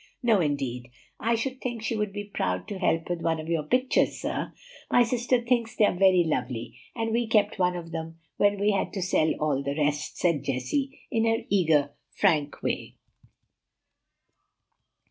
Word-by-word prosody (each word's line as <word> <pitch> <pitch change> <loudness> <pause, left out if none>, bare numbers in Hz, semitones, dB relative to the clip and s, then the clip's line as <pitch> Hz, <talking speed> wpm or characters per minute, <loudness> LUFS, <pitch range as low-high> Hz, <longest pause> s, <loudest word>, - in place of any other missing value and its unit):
"No, 225 -5 +4
indeed; 135 -5 -2 0.3
I 230 +2 +1
should 260 +3 -3
think 240 -3 -4
she 225 +1 -1
would 210 -2 -1
be 205 +1 -5
proud 90 - -2
to 200 - -5
help 165 -3 +1
with 175 -1 -3
one 165 -1 0
of 155 - -7
your 165 -2 0
pictures, 255 - +1
sir. - - -3 0.4
My 245 - +5
sister 245 +1 +1
thinks 235 -1 0
they 215 - +5
are - - +2
very 185 -1 +5
lovely; 125 -7 -3 0.2
and 225 -1 -1
we 235 +1 +1
kept 210 -2 +2
one 180 -1 +2
of 165 -1 -7
them 165 0 -5 0.2
when 205 0 +3
we 205 +1 +3
had 200 - -1
to 195 - -3
sell 160 -3 +2
all 150 -3 +1
the 140 0 -3
rest," 150 0 -1
said 170 -5 +1
Jessie, 265 - -2
in 225 0 +2
her 225 +1 +1
eager, 155 -7 +3 0.2
frank 150 -3 +1
way. - - -3
185 Hz, 180 wpm, -27 LUFS, 150-225 Hz, 0.4 s, My